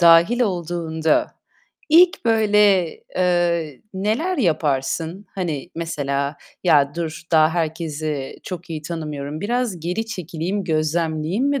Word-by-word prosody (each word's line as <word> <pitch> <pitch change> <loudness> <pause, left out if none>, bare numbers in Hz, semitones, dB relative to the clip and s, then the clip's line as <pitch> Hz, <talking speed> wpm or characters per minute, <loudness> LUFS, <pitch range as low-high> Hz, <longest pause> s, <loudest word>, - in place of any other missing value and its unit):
dâhil 170 +8 +6
olduğunda 170 -5 0 0.5
ilk 340 0 +5
böyle, 210 -5 +4 0.3
eee, 175 -5 +1
neler 225 - 0
yaparsın? 160 - 0
Hani, 170 -4 -3
mesela, 140 -3 -2 0.3
"Ya 145 -5 +4
dur, 165 -2 -4
daha 155 -1 +6
herkesi 155 -4 -3
çok 180 -2 -7
iyi 155 -2 -4
tanımıyorum. 150 -2 -5
Biraz 230 -3 -1
geri 180 +7 -2
çekileyim, 185 -1 -3
gözlemleyeyim." 160 - 0
mi 285 -1 +1
170 Hz, 110 wpm, -21 LUFS, 155-195 Hz, 0.5 s, dâhil